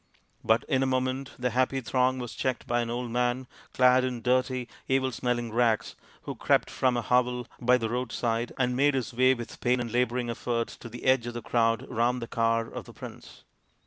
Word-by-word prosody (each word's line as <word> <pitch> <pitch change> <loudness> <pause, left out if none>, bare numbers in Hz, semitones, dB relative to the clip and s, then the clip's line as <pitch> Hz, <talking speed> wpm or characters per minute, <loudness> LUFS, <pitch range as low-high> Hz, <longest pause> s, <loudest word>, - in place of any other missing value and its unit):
But 110 +1 +3
in 135 -3 +2
a 135 - +2
moment 130 +1 -1
the 125 0 -1
happy 130 +2 +1
throng 130 +1 +1
was 125 -2 -5
checked 130 -2 -2
by 120 0 +1
an 115 - -3
old 120 0 -3
man 125 +2 0 0.3
clad 125 0 +5
in 125 -3 -3
dirty 130 0 +1 0.2
evil 130 0 +1
smelling 120 -1 -2
rags, 115 -2 +1 0.3
who - - -4
crept - - +1
from 125 -2 +1
a 120 - -1
hovel 125 0 +1 0.2
by 125 +1 +5
the 115 -2 -2
roadside 120 -1 -2
and 125 -1 +1
made 140 +2 +3
his 120 -5 -2
way 130 +2 +4
with 120 -1 -9
pain 125 0 +2
and 120 -2 -3
labouring 120 0 0
effort 115 0 -2
to 115 - -9
the 120 +1 -9
edge 130 -2 +3
of 120 - -5
the 120 - -5
crowd 115 -1 +1
around 120 +2 0
the 120 - -4
car 115 0 +1
of - - -8
the - - -13
prince. - - -11
125 Hz, 210 wpm, -28 LUFS, 120-130 Hz, 0.3 s, clad